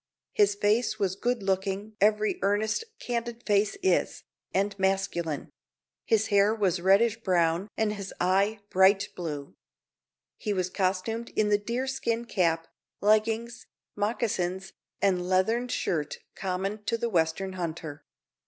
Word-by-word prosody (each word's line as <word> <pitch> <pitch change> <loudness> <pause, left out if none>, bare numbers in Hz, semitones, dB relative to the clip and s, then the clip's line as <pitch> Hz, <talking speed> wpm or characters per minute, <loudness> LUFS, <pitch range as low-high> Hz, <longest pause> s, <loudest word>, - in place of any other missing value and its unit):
His 205 -1 +3
face 215 +2 +1
was 195 -3 0
good 240 +1 -1
looking 195 +2 -1
(every 210 +1 +3
earnest, 210 - +1
candid 235 0 -4
face 205 - +2
is) 380 - +1 0.3
and 200 +2 +1
masculine; 190 -5 -1 0.5
his 220 -1 +2
hair 200 +2 +5
was 190 -5 +1
reddish 205 +5 +4
brown 175 -1 +1
and 215 -1 +1
his 200 -2 -6
eye 200 +4 +2
bright 195 +2 +4
blue. 150 -5 -5 0.8
He 210 - -2
was 185 -1 -1
costumed 195 +5 -1
in 215 -1 +2
the 205 0 +3
deerskin 235 +1 -2
cap, 165 -6 +1 0.3
leggings, 225 +3 +1 0.3
moccasins, 195 -3 -1 0.3
and 180 -2 +2
leathern 225 +7 +2
shirt 160 -11 -2 0.2
common 195 +3 -3
to 230 - 0
the 235 - -1
western 180 0 0
hunter. 160 -4 -5
200 Hz, 125 wpm, -28 LUFS, 185-220 Hz, 0.8 s, hair